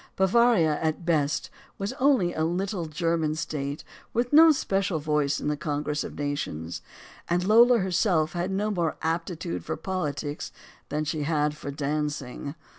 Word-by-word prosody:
Bavaria, 190 Hz, -6 st, +3 dB
at 160 Hz, +2 st, -1 dB
bes<:, 150 Hz, -4 st, +1 dB, 0.3 s
was 195 Hz, +1 st, -3 dB
only 255 Hz, -10 st, +3 dB
a 155 Hz, -, -1 dB
little 180 Hz, +1 st, -1 dB
German 160 Hz, -1 st, 0 dB
state 145 Hz, -2 st, -4 dB, 0.3 s
with 245 Hz, +3 st, 0 dB
no 320 Hz, +2 st, +9 dB
special 195 Hz, -, 0 dB
voice 150 Hz, -2 st, 0 dB
in -, -, -4 dB
the 150 Hz, -, +1 dB
congress 150 Hz, 0 st, -2 dB
of -, -, -8 dB
nations. 85 Hz, -, -3 dB, 0.5 s
And 175 Hz, +1 st, +1 dB
Lola 235 Hz, +5 st, +6 dB
her 190 Hz, -3 st, -1 dB
self 175 Hz, -4 st, +2 dB
had 175 Hz, +1 st, -2 dB
no 205 Hz, +3 st, -1 dB
more 175 Hz, -5 st, -1 dB
aptitude 160 Hz, -, -2 dB
for -, -, -4 dB
politics 150 Hz, -4 st, -3 dB, 0.4 s
than 150 Hz, +1 st, -1 dB
she 150 Hz, 0 st, -2 dB
had 150 Hz, 0 st, 0 dB
for 145 Hz, -, -7 dB
dancing. 145 Hz, -1 st, -3 dB
160 Hz, 155 wpm, -26 LUFS, 150-190 Hz, 0.5 s, no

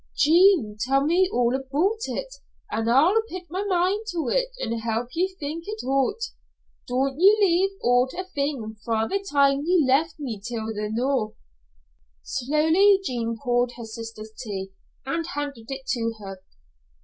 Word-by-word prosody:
"Jean, 320 Hz, -, +5 dB
tell 270 Hz, +4 st, +2 dB
me 360 Hz, +4 st, +3 dB
all 245 Hz, 0 st, +2 dB
aboot 315 Hz, -, -1 dB
it, -, -, -4 dB, 0.4 s
an' 225 Hz, +1 st, -1 dB
I'll 325 Hz, -, +5 dB
pit 370 Hz, 0 st, -6 dB
my 375 Hz, +3 st, -2 dB
mind 390 Hz, +3 st, 0 dB
to 330 Hz, -, -2 dB
it -, -, +1 dB
and 230 Hz, -, -3 dB
help 230 Hz, +1 st, -2 dB
ye 355 Hz, +3 st, +1 dB
think 315 Hz, +3 st, -5 dB
it 430 Hz, +1 st, -5 dB
oot. 270 Hz, -, +1 dB, 0.6 s
Don't 270 Hz, +2 st, -1 dB
ye 400 Hz, +4 st, +7 dB
leave 390 Hz, 0 st, +2 dB
oot 245 Hz, +1 st, +3 dB
a 370 Hz, -, -4 dB
thing 275 Hz, -7 st, -3 dB
fra' 225 Hz, -1 st, 0 dB
the 395 Hz, 0 st, -2 dB
time 280 Hz, -1 st, +4 dB
ye 345 Hz, -2 st, +3 dB
left 305 Hz, +6 st, +2 dB
me 235 Hz, -8 st, -5 dB
till 225 Hz, -1 st, -4 dB
the 210 Hz, 0 st, -3 dB
noo." 240 Hz, -1 st, 0 dB, 0.9 s
Slowly 320 Hz, -, +3 dB
Jean 230 Hz, -7 st, -2 dB
poured 245 Hz, -1 st, 0 dB
her 235 Hz, -, -8 dB
sister's 220 Hz, -1 st, -8 dB
tea 195 Hz, -5 st, -5 dB, 0.3 s
and 330 Hz, +4 st, -2 dB
handed 285 Hz, -6 st, -4 dB
it 270 Hz, -1 st, -6 dB
to 230 Hz, -2 st, 0 dB
her. 195 Hz, -2 st, -9 dB
275 Hz, 160 wpm, -25 LUFS, 230-350 Hz, 0.9 s, ye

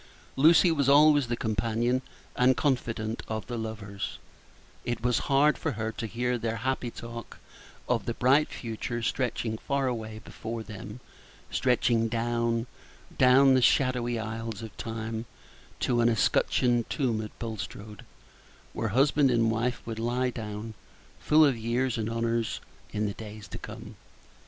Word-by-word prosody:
Lucy 165 Hz, +5 st, +6 dB
was 140 Hz, -4 st, +2 dB
always 145 Hz, -1 st, +6 dB
the 120 Hz, -, -1 dB
companion 115 Hz, +4 st, 0 dB, 0.3 s
and 125 Hz, 0 st, +4 dB
confidante 115 Hz, -5 st, -1 dB
of 110 Hz, -1 st, -3 dB
the 120 Hz, -, -5 dB
lovers; 110 Hz, -3 st, -5 dB, 0.7 s
it 120 Hz, -1 st, -3 dB
was 125 Hz, -1 st, +2 dB
hard 140 Hz, +2 st, +4 dB
for 160 Hz, -, -1 dB
her 110 Hz, 0 st, -3 dB
to 115 Hz, -, -5 dB
hear 120 Hz, +3 st, -1 dB
their 115 Hz, 0 st, -2 dB
happy 125 Hz, +1 st, -2 dB
talk 115 Hz, 0 st, -9 dB, 0.5 s
of -, -, 0 dB
the 115 Hz, -, -1 dB
bright 135 Hz, +5 st, +4 dB
future 120 Hz, 0 st, -4 dB
stretching 115 Hz, -2 st, -1 dB
far 140 Hz, -1 st, -1 dB
away 110 Hz, -4 st, -3 dB
before 115 Hz, 0 st, -6 dB
them 105 Hz, +1 st, -9 dB, 0.5 s
stretching 120 Hz, -2 st, +2 dB
down, 115 Hz, 0 st, 0 dB, 0.5 s
down 130 Hz, +1 st, +6 dB
the 130 Hz, -, +4 dB
shadowy 125 Hz, -2 st, +2 dB
aisles 110 Hz, 0 st, -5 dB
of 110 Hz, -, -9 dB
Time, 110 Hz, 0 st, -4 dB, 0.5 s
to 120 Hz, -1 st, +2 dB
an 115 Hz, -, +4 dB
escutcheoned 120 Hz, +1 st, +2 dB
tomb 120 Hz, -7 st, 0 dB
at 105 Hz, -, -9 dB
Bulstrode, 105 Hz, -2 st, -6 dB, 0.7 s
where 115 Hz, -, -2 dB
husband 135 Hz, +5 st, +3 dB
and 115 Hz, -2 st, +3 dB
wife 120 Hz, +3 st, -1 dB
would 115 Hz, -1 st, -5 dB
lie 125 Hz, +2 st, 0 dB
down, 110 Hz, -1 st, -6 dB, 0.5 s
full 155 Hz, +1 st, +5 dB
of 140 Hz, -3 st, +3 dB
years 120 Hz, +2 st, -1 dB
and 110 Hz, 0 st, -1 dB
honors, 115 Hz, 0 st, -1 dB, 0.3 s
in 105 Hz, 0 st, -1 dB
the 100 Hz, -, -2 dB
days 105 Hz, -1 st, -9 dB
to -, -, -7 dB
come. 110 Hz, +1 st, -9 dB
115 Hz, 145 wpm, -28 LUFS, 110-125 Hz, 0.7 s, Lucy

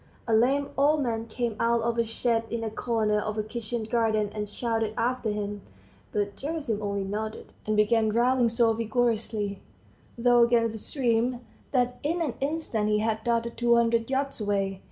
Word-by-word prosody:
A 230 Hz, -, +1 dB
lame 270 Hz, +6 st, +3 dB
old 295 Hz, +1 st, +4 dB
man 230 Hz, -2 st, -2 dB
came 230 Hz, 0 st, -2 dB
out 235 Hz, 0 st, +2 dB
of 235 Hz, 0 st, 0 dB
a -, -, +4 dB
shed 225 Hz, 0 st, 0 dB
in 235 Hz, 0 st, -3 dB
the 220 Hz, -1 st, -3 dB
corner 220 Hz, -2 st, 0 dB
of 215 Hz, +1 st, -3 dB
a 215 Hz, -, 0 dB
kitchen 230 Hz, +1 st, -4 dB
garden 220 Hz, -2 st, +1 dB
and 210 Hz, -1 st, -4 dB
shouted 225 Hz, -1 st, -2 dB
after 245 Hz, -1 st, 0 dB
him; 205 Hz, -1 st, -3 dB, 0.5 s
but 205 Hz, -1 st, -1 dB
Gerasim 280 Hz, -8 st, -3 dB
only 200 Hz, -1 st, -2 dB
nodded, 215 Hz, +3 st, -5 dB
and 215 Hz, 0 st, +1 dB
began 220 Hz, +1 st, +3 dB
rowing 240 Hz, +1 st, +3 dB
so 230 Hz, 0 st, +3 dB
vigorously, 220 Hz, -3 st, -1 dB, 0.6 s
though 240 Hz, 0 st, +4 dB
against 230 Hz, -2 st, +2 dB
stream, 245 Hz, -2 st, +1 dB, 0.3 s
that 250 Hz, -2 st, +1 dB
in 325 Hz, +4 st, -1 dB
an 305 Hz, -8 st, -1 dB
instant 275 Hz, -7 st, -1 dB
he 210 Hz, -, +3 dB
had 220 Hz, 0 st, -1 dB
darted 235 Hz, 0 st, 0 dB
two 235 Hz, 0 st, +4 dB
hundred 230 Hz, 0 st, +2 dB
yards 270 Hz, -2 st, -1 dB
way. 195 Hz, -2 st, -1 dB
230 Hz, 175 wpm, -27 LUFS, 215-240 Hz, 0.6 s, old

